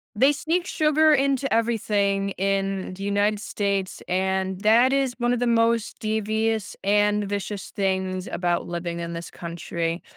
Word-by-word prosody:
They 270 +7 +5
sneak 340 +5 -1
sugar 310 0 +3
into 275 -1 +1
everything 205 -3 +1
in 195 -1 -1
the 195 - -9
United 205 +1 +1
States, 200 -3 -2
and 190 +1 -1
that 235 +5 +5
is 270 -3 +1
one 240 0 +1
of 245 - 0
the 245 - +1
most 230 -1 +1
devious 220 0 -1
and 205 +1 +2
vicious 200 0 -4
things 190 -1 -1
about 175 -1 -1
living 170 0 -4
in 170 0 -5
this 170 0 -6
country. 170 0 -4
205 Hz, 150 wpm, -24 LUFS, 190-230 Hz, -, They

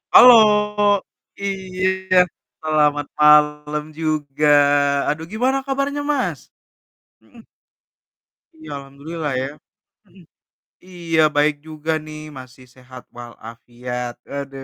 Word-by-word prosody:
Halo 250 -1 +10 1.1
iya, 190 -1 -2 0.4
selamat 150 -2 +1
malam 150 0 +3 0.2
juga, 155 -2 -2 0.6
aduh 160 +2 -3
gimana 255 +4 +1
kabarnya, 275 +1 -2
Mas? 280 -3 -2 0.8
Mhm. 230 -2 -18 1.2
Iya, 315 - -11
alhamdulillah 145 +3 -7
ya, 130 - -3 0.6
mhm, 185 -1 -20 0.6
iya 170 -3 -1
baik 150 0 +2
juga 155 0 -4
nih 155 0 -9 0.2
masih 130 0 -14
sehat 130 0 -13
walafiat 120 +1 -8 0.2
aduh, 135 -1 -6
150 Hz, 90 wpm, -20 LUFS, 135-185 Hz, 1.2 s, Halo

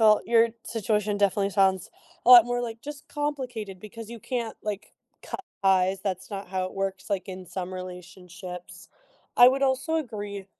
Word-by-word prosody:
all, 215 0 +6
your 230 0 +4 0.2
situation 210 -2 -1
definitely 200 0 +2
sounds 190 -1 +2 0.3
a - - +5
lot 240 -2 +11
more, 245 0 -1
like, 230 -1 -5
just 295 -1 -8
complicated 250 -10 -4
because 215 +2 -9
you 235 0 -8
can't, 240 -4 -3
like, 210 -1 -5 0.3
cut 390 - -7 0.2
ties, 190 0 +3
that's 190 -2 -3
not 195 -2 -6
how 185 0 -1
it 185 - -6
works, 195 0 -3
like, 195 -2 -1
in 185 0 -7
some 185 +1 -5
relationships. 180 0 -9 0.5
I 245 +1 +10
would 270 +1 0
also 270 +4 +1
agree 205 -9 -5
205 Hz, 170 wpm, -27 LUFS, 190-235 Hz, 0.5 s, lot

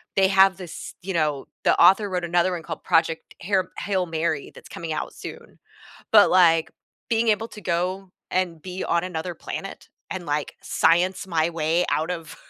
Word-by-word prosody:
they 195 -1 +5
have 190 -1 +5
this 180 -3 -8
you 190 +2 -4
know, 150 -5 0 0.2
the - - +3
author 205 +2 +6
wrote 180 -2 -2
another 175 +2 +2
one 175 -2 -3
called 165 -2 -7
Project 165 0 +1
Hair 190 -1 0
Hail 190 -3 -1
Mary 160 -3 -2
that's - - -14
coming 165 -2 -5
out 155 - -4
soon. - - -10 0.6
But, - - +7
like, 165 -3 +4 0.4
being 230 0 +2
able 220 +1 +1
to 210 - -11
go 185 +1 -2 0.2
and 175 -4 -1
be 185 0 -5
on 170 +1 +1
another 180 -1 -4
planet 195 +4 -7 0.2
and, 185 -2 -4
like, 150 0 -2
science 175 +4 +2
my 165 -2 +1
way 165 +1 +1
out 160 +3 0
of 165 -3 -6
175 Hz, 180 wpm, -24 LUFS, 165-190 Hz, 0.6 s, But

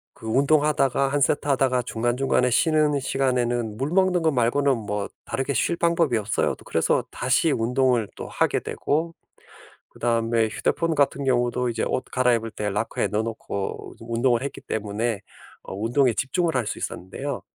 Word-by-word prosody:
그 - - -11
운동하다가 140 +1 +2
1 145 +1 0
세트 145 +1 +1
하다가 130 -2 +2
중간중간에 125 +2 0
쉬는 155 +2 +3
시간에는 120 -4 0
물 135 +6 -2
먹는 185 -1 +2
거 160 - +3
말고는 135 +2 +2
뭐 105 -2 -3 0.2
다르게 135 +1 -2
쉴 170 +8 +1
방법이 170 -6 +2
없어요. 105 +1 0
또 - - -18
그래서 - - +1
다시 - - +1
운동을 125 -1 +1
또 - - -6
하게 - - +1
되고 165 +3 -2 0.8
그다음에 115 -1 +1
휴대폰 165 +8 -1
같은 140 -1 +1
경우도 125 -1 +1
이제 115 - -2
옷 130 - -2
갈아입을 120 -3 +1
때 105 -1 -3
로커에 105 +3 -1
넣어 105 +1 0
놓고 110 -3 -5
좀 115 +1 -8
운동을 120 +1 +2
했기 140 - -6
때문에 105 0 -2 0.4
어 - - -8
운동에 120 +5 +2
집중을 165 - 0
할 120 -4 0
수 - - -3
있었는데요. 120 +11 -5
125 Hz, 355 characters per minute, -24 LUFS, 115-140 Hz, 0.8 s, 쉬는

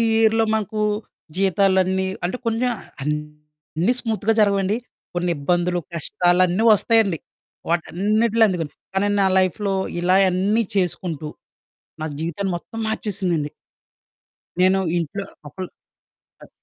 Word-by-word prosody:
ఇయర్‌లో 225 0 +4
మాకు 215 0 -2 0.6
జీతాలన్నీ 190 -1 +2 0.2
అంటే 185 +8 -2
కొంచెం 230 +2 +1 0.3
అన్నీ 150 - -3
స్మూత్‌గా 225 -1 0
జరగవండి. 200 +1 +2 0.4
కొన్ని 175 0 0
ఇబ్బందులు, 175 +4 +1 0.2
కష్టాలన్నీ 180 +3 +2
వస్తాయండి. 210 -5 +3 0.5
వాటన్నిటిలో 210 +7 +2
అందుక 180 -4 -1 0.3
కానీ 200 +1 +2
నా - - +4
లైఫ్‌లో 195 +2 0 0.3
ఇలా 180 +1 +3
అన్నీ 200 +5 +2
చేసుకుంటూ, 175 -4 -1 0.7
నా 155 - -2
జీవితం 170 +4 -3
మొత్తం 225 +6 -9
మార్చేసిందండి. 180 -8 -1 1.1
నేను 190 +1 +4 0.2
ఇంట్లో 175 +4 -3 0.2
అపుల్ 185 +4 -6 0.7
కట్టే - - -14
190 Hz, 100 wpm, -22 LUFS, 175-210 Hz, 1.1 s, ఇయర్‌లో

